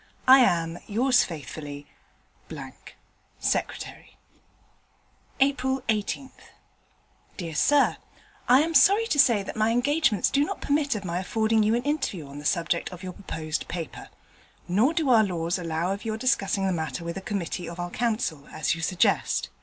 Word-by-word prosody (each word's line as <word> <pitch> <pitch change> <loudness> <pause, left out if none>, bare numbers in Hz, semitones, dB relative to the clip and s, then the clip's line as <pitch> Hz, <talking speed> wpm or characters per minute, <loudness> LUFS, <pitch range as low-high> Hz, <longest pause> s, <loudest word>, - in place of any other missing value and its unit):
I 265 +1 +9
am, 170 -8 +2
Yours 245 +4 +3
faithfully, 145 -2 -7 1.5
Secretary. - - -3 1.2
April 265 -1 +1
18th 220 +5 -1 1.1
Dear 170 -4 -5
Sir, 285 - +3 0.5
I 255 +3 +7
am 330 +2 -1
sorry 400 +9 +5
to 300 -10 -1
say 235 -7 +5
that - - -7
my 220 +1 +2
engagements 245 - +2
do 280 - +3
not - - -4
permit 285 -2 0
of 200 -2 -5
my 175 0 -2
affording 220 +3 +1
you 215 +2 +2
an 240 - -1
interview 285 - -2
on 140 +1 -9
the 145 - -10
subject 170 +2 0
of 180 0 -11
your 185 -1 -6
proposed 160 -5 -5
paper. 170 -3 -6 0.6
Nor 225 - +2
do 320 -4 0
our 225 -2 +6
laws 175 -2 -2
allow 170 +2 -1
of 200 - -7
your 220 -1 -3
discussing 205 -5 +1
the 190 - +1
matter 160 -2 -4
with 170 0 -5
a 195 - -5
Committee 180 -3 -4
of 170 +1 -9
our 175 0 -4
Council, 215 - -2
as 155 - 0
you 165 - -6
suggest. 180 +2 +1
200 Hz, 160 wpm, -26 LUFS, 170-255 Hz, 1.5 s, I